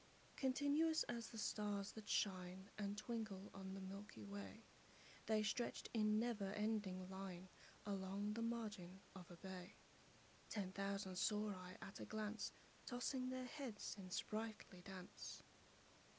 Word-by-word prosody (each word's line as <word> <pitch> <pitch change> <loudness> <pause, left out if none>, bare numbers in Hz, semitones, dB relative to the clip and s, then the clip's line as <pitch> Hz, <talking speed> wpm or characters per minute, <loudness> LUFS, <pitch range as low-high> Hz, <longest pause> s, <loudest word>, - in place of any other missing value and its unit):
Continuous 290 +4 +5
as 235 -2 -1
the 225 - -6
stars 205 -1 +1
that 215 -2 -7
shine 185 0 +2
And 205 0 +1
twinkle 215 -3 -1
on 190 0 -3
the - - -3
milky 195 - -5
way, 100 -1 -5 0.6
The 215 -1 +6
stretched 235 +3 +1
in 215 -2 +6
never 220 -4 +3
ending 210 -4 +2
line 190 -1 -4 0.4
Along 200 +1 +1
the 230 - 0
margin 215 -6 -1 0.2
of 180 -2 -7
a 175 - -8
bay: 185 0 -5 0.7
Ten 195 -4 0
thousand 195 -1 0
saw 210 +2 +4
I 185 -1 -5
at 195 - -6
a - - -2
glance, 215 0 0 0.4
Tossing 255 +1 +1
their 255 0 0
heads 250 -5 -2
in 190 -2 -6
sprightly 215 -2 -1
dance. 185 -1 -6
205 Hz, 135 wpm, -47 LUFS, 190-220 Hz, 0.7 s, The